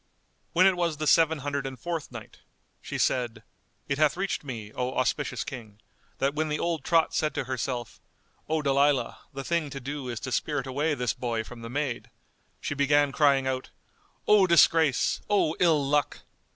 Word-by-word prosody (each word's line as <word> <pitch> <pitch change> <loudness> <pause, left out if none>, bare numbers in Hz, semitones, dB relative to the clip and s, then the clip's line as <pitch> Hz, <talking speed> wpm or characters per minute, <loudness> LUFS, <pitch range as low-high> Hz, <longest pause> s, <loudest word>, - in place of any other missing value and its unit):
When 180 +2 +5
it 190 -1 +5
was 170 -3 -1
the 155 - -3
Seven 160 +2 +4
Hundred 140 -1 -2
and 130 -1 -8
Fourth 170 -5 -4
Night, 115 -3 -10 0.4
She - - -5
said, 120 -3 0 0.4
It 140 +1 -1
hath 155 +1 +3
reached 195 -3 -2
me, 115 -6 -7
O 125 0 -3
auspicious 130 -1 0
King, 110 -5 -9 0.4
that 135 +1 0
when 155 +1 -1
the 150 - 0
old 165 -4 -2
trot 165 0 +2
said 155 -1 0
to - - -1
herself, 125 -2 -4 0.5
"O 155 -1 0
Dalilah, 140 -1 +2
the 135 -1 -6
thing 170 -1 -1
to 140 - -6
do 135 0 -5
is 120 -2 -4
to 130 - -5
spirit 140 +2 -1
away 145 +4 0
this 125 -3 -1
boy 115 -2 -2
from 120 +1 -11
the 115 - -7
maid!" 135 -1 -3 0.5
she - - -3
began 145 0 +3
crying 140 -2 +3
out, 130 0 -2 0.6
"O 205 -3 +6
disgrace! 165 -4 +4
O 200 -6 +2
ill 160 -5 +3
luck!" 145 +1 0
140 Hz, 180 wpm, -27 LUFS, 130-155 Hz, 0.6 s, O